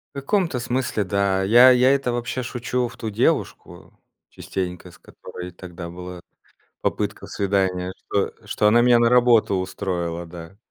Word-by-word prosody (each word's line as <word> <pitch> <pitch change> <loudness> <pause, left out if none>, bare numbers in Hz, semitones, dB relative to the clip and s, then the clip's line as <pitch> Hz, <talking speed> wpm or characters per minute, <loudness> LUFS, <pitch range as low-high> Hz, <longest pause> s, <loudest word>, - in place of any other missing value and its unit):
В 140 - -3
каком-то 165 - 0
смысле- 120 -3 -1
да. 100 0 0
Я 120 +6 +7
я 125 +1 +4
это, 135 -3 +1
вообще, 120 +1 -3
шучу 125 +1 -2
в - - -12
ту 110 - -4
девушку 100 - -2 0.4
частенько, 90 -1 -6
с - - -19
которой 90 0 -10
тогда 85 -1 -9
была 90 0 -9 0.6
попытка - - -3
свидания. 95 -2 -1
Что 100 - -2
что 105 - 0
она 110 +3 +5
меня 120 0 +5
на 115 0 +3
работу 120 -5 +4
устроила, 90 -2 -3
да. 85 +2 -11
100 Hz, 150 wpm, -22 LUFS, 90-125 Hz, 0.6 s, Я